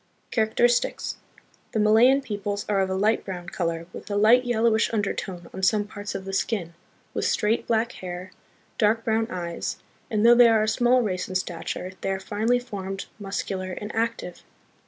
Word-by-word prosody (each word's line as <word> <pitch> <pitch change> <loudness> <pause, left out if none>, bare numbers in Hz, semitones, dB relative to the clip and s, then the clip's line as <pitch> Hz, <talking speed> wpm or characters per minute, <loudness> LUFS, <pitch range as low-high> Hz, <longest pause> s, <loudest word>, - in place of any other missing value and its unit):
Characteristics. 235 +2 +1 0.6
The 220 - +1
Malayan 230 +6 +5
peoples 205 -3 -3
are 205 -2 +1
of 190 -1 +1
a 190 - -1
light 210 +4 +2
brown 180 -3 -6
color, 165 -2 -2
with - - -9
a 205 - -2
light 225 +5 +5
yellowish 230 -1 +2
undertone 195 -4 -3
on 190 - -6
some 205 +2 +3
parts 205 0 -7
of 190 - -5
the 195 - -5
skin, 190 -4 -1 0.4
with - - -1
straight 215 +2 +1
black 230 +1 +1
hair, 180 -1 -7 0.5
dark 220 +1 +3
brown 225 0 +1
eyes, 170 -3 -4 0.3
and, 215 -2 +1
though 235 - +9
they 240 0 +7
are 220 -1 +4
a - - 0
small 245 +3 +3
race 185 -4 -2
in 185 - -6
stature, 180 0 -3
they - - -2
are 190 0 -1
finely 220 +5 +1
formed, 195 -5 -5
muscular, 190 -2 -4
and 210 +3 -6
active. 225 -6 -2
210 Hz, 175 wpm, -25 LUFS, 190-225 Hz, 0.6 s, though